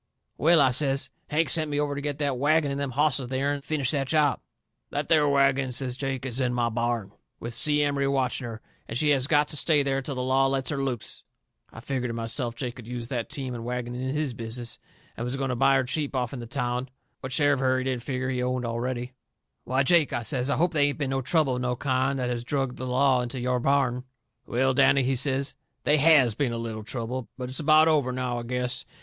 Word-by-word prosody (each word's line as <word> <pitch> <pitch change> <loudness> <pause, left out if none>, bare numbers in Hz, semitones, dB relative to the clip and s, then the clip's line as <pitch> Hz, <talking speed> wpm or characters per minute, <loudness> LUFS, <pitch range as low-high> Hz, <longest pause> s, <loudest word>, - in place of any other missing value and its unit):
"Well," 165 +2 +5
I 130 -2 +5
says, 135 0 0 0.2
"Hank 160 +2 +2
sent 155 -2 +2
me 145 0 -1
over 145 -1 0
to 140 - -4
get 145 -1 -3
that 140 -4 -1
wagon 150 +1 +2
and 140 - -3
them 140 -1 -2
hosses 145 +1 +2
of 125 -2 -6
theirn 140 +2 0
and 140 - -12
finish 140 -5 0
that 140 -3 -1
job." 150 -2 +2 0.5
"That 145 0 -3
there 150 -3 +4
wagon," 135 -2 +2
says 125 0 -3
Jake, 135 -1 -3
"is 130 -1 -2
in 125 -2 0
my 120 -1 +1
barn, 115 -3 -2 0.3
with 120 0 -5
Si 150 +5 +2
Emery 140 -1 0
watching 130 -2 0
her, 110 -1 -8 0.3
and 115 - -3
she 150 +3 +1
has 135 -2 +3
got 150 -1 +3
to - - -4
stay 150 -1 +3
there 135 0 0
till 135 +1 -5
the 125 - -2
law 135 +1 +3
lets 135 -1 -1
her 140 -2 -2
loose." 130 -5 -4 0.5
I 115 - -10
figgered 125 -1 -2
to - - -3
myself 115 +1 -1
Jake 125 0 -5
could 120 -3 -11
use 120 -1 -5
that 120 -4 -3
team 135 -5 -4
and 115 -1 -6
wagon 120 0 -4
in 130 +3 -3
his 150 -4 -1
business, 115 +1 -3 0.4
and 115 - -5
was 125 +2 -2
going 135 -1 -2
to 125 - -1
buy 135 +2 +4
her 135 - +3
cheap 140 +3 -2
offn 125 0 -2
the 120 - -7
town, 125 0 -2 0.3
what 130 - -7
share 145 +1 +3
of 135 - -1
her 130 -1 +2
he 130 - -1
didn't 130 -2 -2
figger 130 +1 -3
he 125 -1 -1
owned 125 0 -1
already. 120 +2 -3 0.5
"Why, 130 +2 +1
Jake," 160 -1 +3
I 120 -1 -1
says, 130 +1 -1
"I 145 - +1
hope 170 +3 +1
they 145 -2 +3
ain't 140 - -4
been 140 -3 -2
no 135 0 0
trouble 140 -2 +1
of - - -3
no 125 0 0
kind 130 +1 0
that 125 -1 -1
has 120 -1 -3
drug 135 0 -2
the 130 - -4
law 130 0 +3
into 125 +1 -4
your 125 0 0
barn!" 125 -1 +1 0.4
"Well, 130 +2 +1
Danny," 135 +1 +4
he 130 +1 +1
says, 135 +1 0 0.3
"they 150 +3 +4
HAS 140 -6 +5
been 120 +1 -1
a - - -3
little 115 -2 -5
trouble. 120 +2 -4
But 125 -1 -5
it's 130 - -3
about 155 +1 +5
over, 145 -5 +2
now, 125 -1 -2
I - - -4
guess. 125 +1 -1
130 Hz, 250 wpm, -26 LUFS, 125-140 Hz, 0.5 s, Well